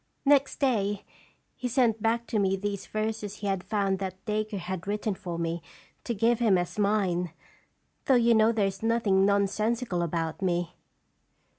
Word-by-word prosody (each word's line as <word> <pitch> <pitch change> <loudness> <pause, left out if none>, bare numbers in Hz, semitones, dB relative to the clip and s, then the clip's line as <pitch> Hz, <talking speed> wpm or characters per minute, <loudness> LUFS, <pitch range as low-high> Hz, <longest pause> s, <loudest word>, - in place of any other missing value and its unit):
Next 280 -1 +4
day 205 -7 0 0.5
he 250 - -3
sent 230 -3 +2
back 230 +2 +1
to 220 - -1
me 195 -1 +2
these 200 0 -4
verses 215 -1 -3
he 210 - -8
had 195 -2 -1
found 195 -3 0
that 190 -1 -4
Dacre 215 0 -2
had 185 0 -5
written 210 +1 -1
for 175 -3 -6
me 170 0 -2 0.4
to 235 - -2
give 230 +3 +2
him 215 -6 +4
as 175 +3 -3
mine, 190 -5 +1 0.7
though 265 - +4
you 235 -1 +5
know 220 0 +5
there 220 -3 +1
is 195 0 -3
nothing 220 -4 +3
nonsensical 205 0 +1
about 165 0 -2
me." 175 -2 0
205 Hz, 165 wpm, -28 LUFS, 190-225 Hz, 0.7 s, you